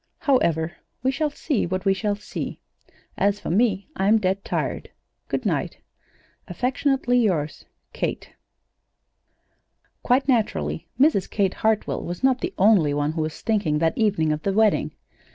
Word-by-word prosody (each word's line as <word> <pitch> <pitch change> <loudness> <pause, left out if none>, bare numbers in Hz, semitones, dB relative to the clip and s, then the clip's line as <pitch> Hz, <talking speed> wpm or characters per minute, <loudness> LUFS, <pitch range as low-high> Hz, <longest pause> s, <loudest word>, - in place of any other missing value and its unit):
"However, 170 - +1 0.3
we 260 - +2
shall 300 +2 0
see 285 - -1
what 185 +2 -3
we 195 - +4
shall 205 +1 -1
see. 205 - -6 0.6
As 200 +1 +2
for - - -4
me, 200 0 +1
I'm 210 -1 +3
dead 195 -1 -1
tired. - - -3 0.4
Good - - -3
night. - - -1 0.7
"Affectionately 255 -1 +1
yours, 165 -10 -1 0.3
"KATE." - - -3 1.7
Quite 265 +2 +2
naturally, 80 - 0
Mrs. 270 - +3
Kate 195 -3 +1
Hartwell 220 -1 0
was 175 +7 -6
not 260 -1 +3
the - - -3
only 185 -8 +4
one 145 +1 0
who 160 0 -3
was 155 0 -4
thinking 200 -9 +1
that 160 +1 +1
evening 200 -8 +1
of 150 0 -2
the 195 +4 -1
wedding. 215 0 +2
200 Hz, 145 wpm, -24 LUFS, 165-245 Hz, 1.7 s, we